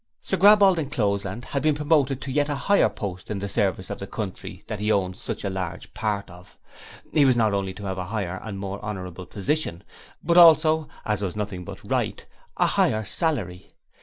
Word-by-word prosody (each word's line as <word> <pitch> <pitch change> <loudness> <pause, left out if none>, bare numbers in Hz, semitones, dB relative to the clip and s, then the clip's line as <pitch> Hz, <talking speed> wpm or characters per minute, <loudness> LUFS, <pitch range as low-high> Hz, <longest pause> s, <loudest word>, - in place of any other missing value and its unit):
Sir - - -2
Graball 200 +1 +7
D'Encloseland 105 - -1
had 140 - -2
been 155 +1 +2
promoted 145 -3 +1
to 130 - -5
yet 145 +2 +1
a 145 - 0
higher 200 +8 +3
post 95 -3 -6
in 105 - -2
the 100 +1 -3
service 95 -3 -1
of - - -5
the 100 - -6
country 95 -2 -6
that 110 - -5
he 105 +1 0
owned 95 -3 +1
such - - -5
a - - -1
large 95 -3 -5
part 105 -2 -2
of; 90 0 -15 0.6
he 150 - +5
was 130 -2 +5
not 110 -3 +3
only 95 -1 -2
to 100 - -9
have 95 -1 -3
a 90 - -3
higher 95 -2 -3
and 105 -3 -6
more 95 0 -5
honourable 90 -4 -6
position, 100 - -2 0.4
but 170 +1 +2
also 160 -2 +6 0.2
as 105 -2 -1
was 95 -3 -3
nothing 100 -4 -4
but - - -10
right - - -1 0.3
a - - +3
higher 110 0 +2
salary. 110 - -2
105 Hz, 200 wpm, -25 LUFS, 95-145 Hz, 0.6 s, Graball